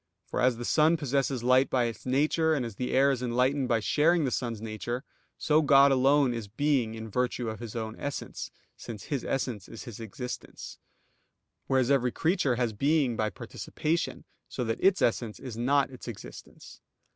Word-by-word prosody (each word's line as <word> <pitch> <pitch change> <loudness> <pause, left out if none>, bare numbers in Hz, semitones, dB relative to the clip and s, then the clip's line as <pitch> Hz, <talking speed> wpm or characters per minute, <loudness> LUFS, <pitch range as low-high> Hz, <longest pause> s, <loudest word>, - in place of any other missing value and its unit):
For - - -3
as 125 -2 +3
the 120 - -5
sun 160 +5 +4
possesses 135 -3 -1
light 130 +2 +4
by 125 -2 +2
its 115 +1 -4
nature, 155 +4 +2
and 130 -5 -1
as 115 - -6
the 125 - -2
air 140 +1 +4
is 130 -3 -2
enlightened 125 +2 +1
by 115 -2 +1
sharing 160 +7 +3
the 130 - -1
sun's 120 -4 -2
nature; 115 +3 -4 0.3
so 155 +1 +3
God 140 -1 +6
alone 135 0 +4
is 115 -3 -5
Being 120 0 0
in 110 0 -7
virtue 125 +1 -1
of 110 - -8
His 115 -2 -8
own 110 -1 -4
Essence, 140 0 -5 0.3
since 105 -5 -8
His 140 -5 -3
Essence 125 -7 -3
is 115 - -9
His 120 -5 -9
existence; 120 +3 -7 0.9
whereas 130 -1 +2
every 125 -3 +3
creature 160 -6 +1
has 120 -2 -1
being 140 +1 +2
by 110 -1 0
participation, 160 +9 -3 0.2
so - - -3
that 115 -1 -3
its 195 0 +4
essence 115 -2 0
is 125 -4 -7
not 135 +4 +2
its 130 - -11
existence. 115 -4 -10
125 Hz, 180 wpm, -28 LUFS, 115-140 Hz, 0.9 s, God